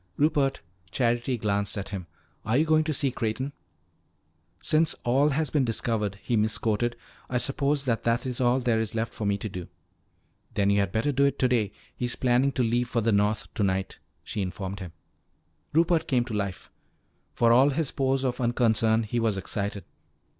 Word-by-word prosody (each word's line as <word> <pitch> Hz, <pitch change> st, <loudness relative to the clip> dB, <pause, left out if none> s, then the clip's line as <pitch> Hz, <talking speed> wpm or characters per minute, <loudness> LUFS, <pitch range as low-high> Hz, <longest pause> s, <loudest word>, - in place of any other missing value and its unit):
"Rupert," 140 Hz, -2 st, +2 dB, 0.3 s
Charity 120 Hz, +3 st, 0 dB
glanced 100 Hz, -1 st, -1 dB
at 100 Hz, -, -4 dB
him, 95 Hz, -4 st, -6 dB, 0.4 s
"are 110 Hz, +4 st, +1 dB
you 155 Hz, -, +3 dB
going 155 Hz, 0 st, +3 dB
to 155 Hz, -, 0 dB
see 140 Hz, -2 st, 0 dB
Creighton?" 125 Hz, +5 st, -3 dB, 1.1 s
"Since 160 Hz, -, +2 dB
all 135 Hz, +5 st, +3 dB
has 150 Hz, +1 st, -1 dB
been 145 Hz, -3 st, +2 dB
discovered," 110 Hz, -4 st, -1 dB
he 120 Hz, -, 0 dB
misquoted, 110 Hz, +2 st, +1 dB, 0.3 s
"I 125 Hz, -, 0 dB
suppose 140 Hz, +2 st, +1 dB
that 115 Hz, -3 st, 0 dB
that 115 Hz, +2 st, +1 dB
is 125 Hz, -1 st, -2 dB
all 125 Hz, +1 st, +3 dB
there 120 Hz, -3 st, +1 dB
is 110 Hz, 0 st, -2 dB
left 115 Hz, +1 st, -2 dB
for 105 Hz, -, -3 dB
me 100 Hz, 0 st, +1 dB
to 110 Hz, -, -5 dB
do." 90 Hz, -4 st, -7 dB, 0.9 s
"Then 100 Hz, -1 st, +2 dB
you 100 Hz, -, +3 dB
had 100 Hz, -2 st, 0 dB
better 115 Hz, +8 st, +1 dB
do 140 Hz, +1 st, +3 dB
it 140 Hz, -, +1 dB
today; 120 Hz, -6 st, +1 dB, 0.2 s
he's 120 Hz, 0 st, -2 dB
planning 130 Hz, +2 st, +2 dB
to 130 Hz, -, +1 dB
leave 120 Hz, +1 st, 0 dB
for 120 Hz, -2 st, 0 dB
the 115 Hz, +1 st, +2 dB
North 105 Hz, +1 st, 0 dB
tonight," 95 Hz, -2 st, -1 dB, 0.2 s
she 105 Hz, -, -4 dB
informed 95 Hz, +1 st, -4 dB
him. 90 Hz, -4 st, -7 dB, 0.8 s
Rupert 165 Hz, +1 st, +2 dB
came 125 Hz, -3 st, +2 dB
to 115 Hz, -, -6 dB
life. 100 Hz, -3 st, -4 dB, 0.6 s
For 115 Hz, -1 st, +4 dB
all 130 Hz, +4 st, +6 dB
his 145 Hz, 0 st, 0 dB
pose 135 Hz, 0 st, 0 dB
of 125 Hz, -1 st, -1 dB
unconcern, 115 Hz, -2 st, +2 dB
he 115 Hz, +2 st, -2 dB
was 110 Hz, -3 st, +1 dB
excited. 100 Hz, +1 st, -4 dB
120 Hz, 180 wpm, -27 LUFS, 105-135 Hz, 1.1 s, all